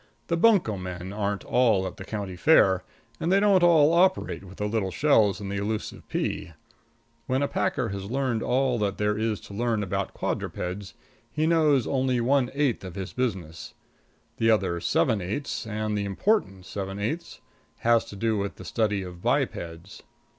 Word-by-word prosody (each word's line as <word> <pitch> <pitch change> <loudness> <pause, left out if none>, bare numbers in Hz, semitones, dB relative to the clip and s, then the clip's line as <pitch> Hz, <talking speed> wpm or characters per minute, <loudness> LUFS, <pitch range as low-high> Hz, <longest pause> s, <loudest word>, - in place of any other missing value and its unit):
The 170 - +2
bunco 170 - +3
men 90 0 -6
aren't 100 -1 -2
all 110 -7 +2
at 95 - -6
the - - -7
county 100 -2 -5
fair, 95 - +4 0.4
and 170 - 0
they 195 - +5
don't 200 -2 +4
all 165 -3 +5
operate 185 - +2
with 95 0 -12
the 105 - -2
little 105 -3 -1
shells 110 -3 +3
and 100 -1 -5
the 100 - -2
elusive 105 +2 -4
pea. 80 - -3 0.7
When 130 +2 +1
a - - +1
packer - - -1
has 100 0 -5
learned 130 -3 0
all 125 -1 +1
that 100 -2 -1
there 105 0 +1
is 110 -1 -1
to - - -11
learn 115 0 0
about 100 0 -3
quadrupeds, 95 +2 -4 0.4
he 155 +1 0
knows 155 -6 +3
only 130 -2 +1
one 125 +1 +2
eighth 140 -7 +1
of 95 -1 -8
his 95 -2 -5
business; 95 -11 -4 0.6
the 115 - +2
other 95 -6 +2
seven 125 - +1
eighths, 110 +6 -4
and 110 0 -2
the 100 -1 -1
important 100 - 0
seven 95 0 -5
eighths, 115 +12 -4 0.4
has 115 0 +4
to - - -10
do 110 +1 0
with 100 0 -3
the - - -11
study 105 -4 0
of 90 -1 -9
bipeds. 85 +2 -2
105 Hz, 175 wpm, -26 LUFS, 95-135 Hz, 0.7 s, they